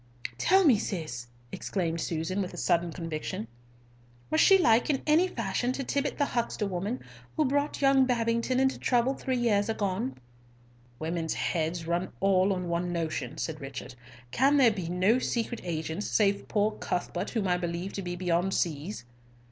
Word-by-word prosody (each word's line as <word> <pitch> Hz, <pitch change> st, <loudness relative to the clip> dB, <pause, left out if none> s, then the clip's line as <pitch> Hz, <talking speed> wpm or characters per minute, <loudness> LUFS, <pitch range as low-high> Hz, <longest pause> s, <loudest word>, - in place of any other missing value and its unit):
"Tell 380 Hz, +1 st, +5 dB
me, 250 Hz, -9 st, +6 dB
Cis," 155 Hz, -, -4 dB, 0.2 s
exclaimed 170 Hz, -4 st, -2 dB
Susan, 170 Hz, +5 st, -2 dB
with 185 Hz, -, -5 dB
a -, -, -9 dB
sudden 175 Hz, -1 st, +1 dB
conviction, 155 Hz, -, -4 dB, 0.8 s
"was 155 Hz, -, +4 dB
she 390 Hz, -, +7 dB
like 235 Hz, -9 st, +4 dB
in 275 Hz, -3 st, 0 dB
any 315 Hz, +4 st, +4 dB
fashion 240 Hz, -, -1 dB
to 275 Hz, -, -3 dB
Tibbott 280 Hz, +2 st, -1 dB
the 285 Hz, -, +2 dB
huckster 235 Hz, -4 st, -1 dB
woman 200 Hz, +6 st, -3 dB, 0.3 s
who 310 Hz, -, +3 dB
brought 285 Hz, +1 st, 0 dB
young 270 Hz, -1 st, +5 dB
Babington 235 Hz, +1 st, +1 dB
into 265 Hz, 0 st, +2 dB
trouble 245 Hz, +1 st, +2 dB
three 260 Hz, -1 st, -2 dB
years 220 Hz, -3 st, +2 dB
agone?" 220 Hz, +3 st, -1 dB, 0.8 s
"Women's 160 Hz, +1 st, -2 dB
heads 165 Hz, 0 st, -1 dB
all 185 Hz, +2 st, +1 dB
run -, -, +2 dB
on 180 Hz, -2 st, -2 dB
one 170 Hz, +1 st, -1 dB
notion," 165 Hz, -2 st, -3 dB
said 155 Hz, -1 st, -4 dB
Richard. 135 Hz, -1 st, -7 dB, 0.4 s
"Can 275 Hz, -, +4 dB
there 250 Hz, -5 st, +6 dB
be 185 Hz, -5 st, -4 dB
no 185 Hz, +7 st, +3 dB
secret 235 Hz, -1 st, -2 dB
agents 160 Hz, +2 st, -3 dB
save 200 Hz, -2 st, +1 dB
poor 210 Hz, 0 st, +1 dB
Cuthbert, 175 Hz, -2 st, -3 dB
whom 215 Hz, -5 st, -1 dB
I 180 Hz, 0 st, +2 dB
believe 175 Hz, +2 st, -4 dB
to 200 Hz, -, -3 dB
be 175 Hz, -1 st, -4 dB
beyond 175 Hz, +1 st, 0 dB
seas?" 155 Hz, -, -2 dB
195 Hz, 165 wpm, -29 LUFS, 170-245 Hz, 0.8 s, she